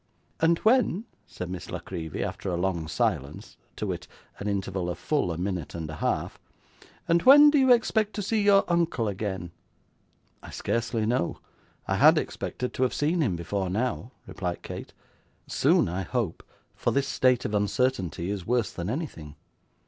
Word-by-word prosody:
'And 165 +1 +4
when,' 225 -3 +3 0.2
said 90 -1 -6
Miss 90 - -6
La - - -3
Creevy, 80 -4 -5
after 100 0 -4
a 90 - -1
long 85 -3 -1
silence, 75 -1 -2 0.2
to - - -3
wit, - - -4 0.3
an 100 - -4
interval 95 -3 -2
of 90 - -4
full 115 - 0
a 80 - -4
minute 90 -3 -3
and 80 -2 -4
a 80 - -7
half, - - -2 0.8
'when 290 +3 +9
do 295 - +4
you 260 -1 +5
expect 220 -3 +2
to 205 - -2
see 215 +2 +1
your 200 -1 +5
uncle 170 -10 +1
again?' 95 -4 -4 0.9
'I - - -11
scarcely 115 -1 -1
know; 115 -6 0 0.5
I - - 0
had - - +7
expected 125 - -3
to - - -4
have 130 - +2
seen 160 +4 +1
him 110 - +1
before 90 +3 -2
now,' 115 +4 -2
replied 90 -3 -5
Kate. - - -7 0.5
'Soon - - +3
I 90 +3 -2
hope, 115 -4 -2 0.3
for - - -1
this 140 0 +1
state 130 -3 +2
of 105 - -2
uncertainty 100 -4 0
is 100 -3 -4
worse 120 +1 0
than 85 +2 -4
anything. 110 - -5
105 Hz, 170 wpm, -27 LUFS, 90-145 Hz, 0.9 s, when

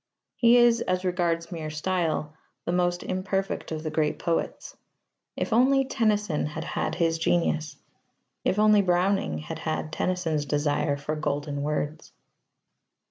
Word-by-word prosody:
He 240 0 +5
is, 240 -1 +5
as 185 0 -1
regards 170 -2 0
mere 160 -3 -4
style, 155 -1 -1 0.3
the - - -1
most 175 0 +1
imperfect 190 0 -2
of 155 -1 -4
the 155 - -3
great 155 -1 0
poets. 165 -1 -2 0.6
If - - -1
only 270 +3 +4
Tennyson 210 - 0
had 155 +1 -5
had - - -2
his 165 -1 +1
genius! 160 -3 0 0.7
If 185 - +1
only 210 -1 +5
Browning 180 - +1
had 75 - -6
had 80 0 -3
Tennyson's 165 -5 -1
desire 145 0 0
for 145 +2 -3
golden 145 -1 -2
words! 150 +1 -3
165 Hz, 135 wpm, -26 LUFS, 150-190 Hz, 0.7 s, He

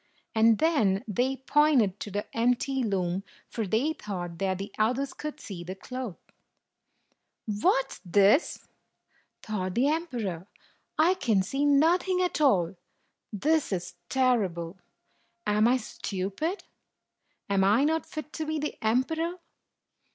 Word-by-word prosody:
And 225 0 +5
then 220 - +2
they 250 +6 0
pointed 270 -11 +3
to - - -5
the 205 +1 -3
empty 250 +3 +1
loom, 190 -4 -1 0.2
for 225 -3 -3
they 250 +11 +1
thought 175 - -6
that 190 -1 0
the 195 +2 -6
others 255 +6 +1
could 300 0 -6
see 180 -4 -7
the 185 +2 -6
cloth. 250 -1 -6 1.3
"What 230 +5 +1
's - - -10
this?" 200 - +3 0.8
thought 185 -4 -3
the 265 +4 +3
emperor; 235 - -3 0.5
"I 330 +4 +5
can 225 - +1
see 275 +9 -1
nothing 340 +6 +3
at 360 -3 0
all! 190 - +3 0.5
This 300 +8 +1
is 180 -2 -3 0.2
terrible! 195 -9 0 0.7
Am 210 +1 +3
I 250 +2 +4
stupid? 215 - -4 0.8
Am 195 -1 +2
I 210 +7 +4
not 320 +2 +1
fit 305 -1 -7
to 315 - -3
be 305 -1 -2
emperor? 320 +10 0
230 Hz, 130 wpm, -28 LUFS, 195-290 Hz, 1.3 s, And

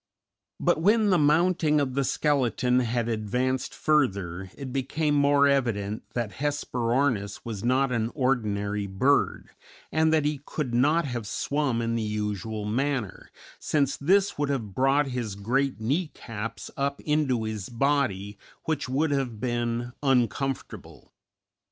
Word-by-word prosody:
But - - +2
when 210 +3 +4
the 180 - +4
mounting 155 +1 +3
of 135 -3 -1
the 140 +1 +1
skeleton 125 -3 +1
had 120 -1 0
advanced 125 +4 -1
further 95 - 0
it 135 -3 -6
became 145 +3 0
more 140 0 +4
evident 110 -7 0
that 120 -4 -1
Hesperornis 125 -6 0
was 110 -3 -5
not 130 +2 +2
an 115 -2 0
ordinary 105 -6 0
bird, 130 +9 +1 0.4
and 160 0 +3
that 155 -2 +2
he 150 -2 -1
could 140 -5 -4
not 150 +7 +3
have 120 -5 -4
swum 135 -1 -1
in 115 0 -1
the 115 - 0
usual 105 0 -3
manner, 125 -2 -2 0.3
since 140 -3 +1
this 195 +4 +2
would 145 -1 0
have 115 -8 -2
brought 135 +4 +3
his 120 -5 -3
great 130 +6 0
knee 145 +11 0
caps 115 -1 -6
up 140 0 -1
into 150 -6 +1
his 110 -3 -4
body, 120 -6 0 0.2
which 155 -4 -2
would 145 +4 +1
have 130 -6 -1
been 120 0 -2
uncomfortable. 135 0 -1
130 Hz, 140 wpm, -26 LUFS, 110-145 Hz, 0.4 s, when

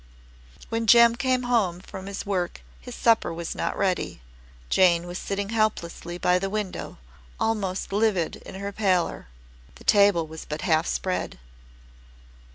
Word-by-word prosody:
When 225 0 -2
Jem 235 +1 +7
came 255 0 0
home 220 -8 +1
from 190 0 -9
his 200 0 -5
work 185 -3 -2 0.2
his 250 -1 -9
supper 230 -5 +3
was 170 0 -4
not - - -3
ready. 185 - -1 0.4
Jane 175 - +4
was 175 +1 -6
sitting 200 0 -3
helplessly 195 -6 -1
by 180 0 +2
the 195 +1 -2
window, 210 -2 -4 0.4
almost 200 -4 -1
livid 205 -5 +1
in - - -11
her 200 +1 -4
pallor. 190 - 0 0.5
The - - -15
table 200 -5 +4
was 160 0 -9
but 150 +1 -5
half 160 -2 +2
spread. 185 -1 -2
195 Hz, 145 wpm, -25 LUFS, 175-215 Hz, 0.5 s, Jem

